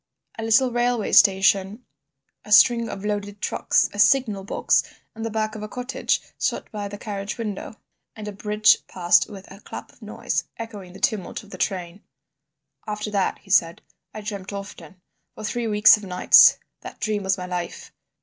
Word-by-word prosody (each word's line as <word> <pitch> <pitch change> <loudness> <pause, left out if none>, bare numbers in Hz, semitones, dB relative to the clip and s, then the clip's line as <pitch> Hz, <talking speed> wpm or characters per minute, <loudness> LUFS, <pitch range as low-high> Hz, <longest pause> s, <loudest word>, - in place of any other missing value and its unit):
A - - -3
little 245 +3 +3
railway 240 -2 0
station, 195 +3 +3 0.6
a 210 - -13
string 230 +2 +5
of 200 +1 -7
loaded 205 -1 -3
trucks, - - +1
a 205 - -8
signal 215 -5 +3
box, 195 - +1 0.3
and 225 - -8
the 225 - -2
back 215 0 -2
of 215 - -8
a 215 - -5
cottage, 250 +4 -2 0.2
shot - - -2
by 205 -2 -5
the 205 0 -8
carriage 200 0 -5
window, 215 -2 -5 0.4
and 215 -1 -8
a - - -4
bridge 210 +2 +3
passed 175 -1 +2
with 195 -2 -10
a 195 - -12
clap - - -10
of - - -26
noise, - - -3
echoing 205 -6 -9
the 190 - -12
tumult 210 -2 -2
of 205 - -17
the - - -8
train. 185 -1 -3 0.9
"After 210 0 -4
that," 200 -2 0
he 195 - -12
said, 170 -2 +2 0.3
"I 215 - -8
dreamt 200 -2 -6
often. 190 -3 -9 0.4
For - - -9
three 230 +2 -2
weeks 210 0 +6
of 210 - -12
nights 180 -2 +6 0.2
that - - -11
dream 215 -2 -1
was 190 0 0
my 180 - -6
life. 180 -1 -6
210 Hz, 180 wpm, -23 LUFS, 195-220 Hz, 0.9 s, weeks